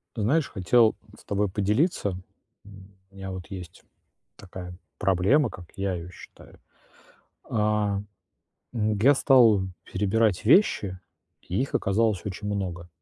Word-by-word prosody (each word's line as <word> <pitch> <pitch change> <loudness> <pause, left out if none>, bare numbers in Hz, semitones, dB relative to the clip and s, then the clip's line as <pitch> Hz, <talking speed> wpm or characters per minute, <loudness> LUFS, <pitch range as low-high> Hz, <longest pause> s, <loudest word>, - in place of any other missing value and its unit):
Ты 110 - -3
знаешь, 145 +7 +1
хотел 110 +4 +3 0.2
с - - -19
тобой 100 0 0
поделиться, 105 - 0 0.5
у 95 -1 -17
меня 95 -1 -7
вот 95 -3 -7
есть 90 -2 -9 0.5
такая 90 -2 -10 0.2
проблема, 100 - +2
как 90 -2 -11
я 95 -1 -1
её 85 0 -7
считаю. - - -15 0.9
А, 105 -2 0 0.7
я 110 +3 +3
стал 120 -8 +5 0.2
перебирать 105 0 0
вещи, 105 - +3 0.4
и 90 +6 -2
их 135 - -3
оказалось 105 -1 +1
очень 105 +1 -6
много 90 -4 -4
100 Hz, 120 wpm, -26 LUFS, 95-110 Hz, 0.9 s, стал